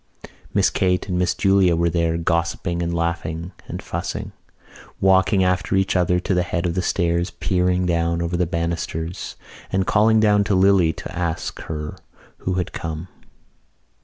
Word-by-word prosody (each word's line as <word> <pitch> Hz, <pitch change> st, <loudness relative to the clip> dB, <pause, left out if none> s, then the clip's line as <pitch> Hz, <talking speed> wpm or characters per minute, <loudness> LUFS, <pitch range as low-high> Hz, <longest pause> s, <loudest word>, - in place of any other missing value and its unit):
Miss -, -, +3 dB
Kate 90 Hz, 0 st, +1 dB
and 90 Hz, -2 st, -1 dB
Miss 90 Hz, -, +1 dB
Julia 95 Hz, -3 st, +3 dB
were 85 Hz, +1 st, +2 dB
there, 85 Hz, -1 st, +1 dB
gossiping 85 Hz, +1 st, -1 dB
and 85 Hz, 0 st, -1 dB
laughing 85 Hz, 0 st, -2 dB, 0.2 s
and -, -, -6 dB
fussing, -, -, -4 dB, 0.7 s
walking 95 Hz, +1 st, +4 dB
after 90 Hz, +1 st, +1 dB
each 95 Hz, 0 st, +1 dB
other 90 Hz, -1 st, +2 dB
to 95 Hz, -, -1 dB
the 90 Hz, -, +2 dB
head 90 Hz, 0 st, -2 dB
of 85 Hz, -, 0 dB
the 95 Hz, -, 0 dB
stairs, 85 Hz, -1 st, 0 dB
peering 90 Hz, +1 st, 0 dB
down 85 Hz, -1 st, +1 dB
over 85 Hz, +1 st, -2 dB
the 90 Hz, 0 st, +1 dB
banisters 85 Hz, 0 st, -3 dB, 0.4 s
and 95 Hz, 0 st, +1 dB
calling 110 Hz, +2 st, +4 dB
down 105 Hz, -1 st, +4 dB
to 100 Hz, -2 st, +1 dB
Lily 95 Hz, -3 st, +4 dB
to 80 Hz, -, -8 dB
ask 85 Hz, -2 st, -3 dB
her 75 Hz, -1 st, -5 dB, 0.4 s
who 90 Hz, -, -2 dB
had 90 Hz, -1 st, -2 dB
come. 80 Hz, +2 st, -5 dB
90 Hz, 160 wpm, -22 LUFS, 85-95 Hz, 0.7 s, walking